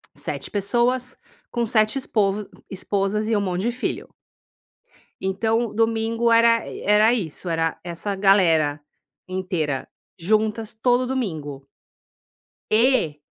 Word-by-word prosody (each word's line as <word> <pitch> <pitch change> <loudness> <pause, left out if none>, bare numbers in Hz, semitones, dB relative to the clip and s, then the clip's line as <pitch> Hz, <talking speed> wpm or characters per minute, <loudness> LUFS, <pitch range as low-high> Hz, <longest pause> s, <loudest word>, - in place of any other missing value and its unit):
7 - - -5
pessoas 240 +5 0 0.3
com 240 -1 0
7 215 +1 +2
espov 210 -5 0 0.2
esposas 200 +2 -1
e 225 - +1
um 205 - +1
monte 185 -2 -2
de 240 - +1
filho. 250 - -4 1.2
Então 220 +4 0
domingo 225 +1 +1
era 230 0 +4
era 210 +3 +4
isso. 180 -5 -3
Era 165 -1 -1
essa 175 +4 -4
galera 165 -7 +3 0.5
inteira 180 -7 -2 0.3
juntas 215 +4 0
todo 245 +3 +2
domingo. 155 - -4 1.1
E 220 - +3
210 Hz, 110 wpm, -23 LUFS, 185-230 Hz, 1.2 s, era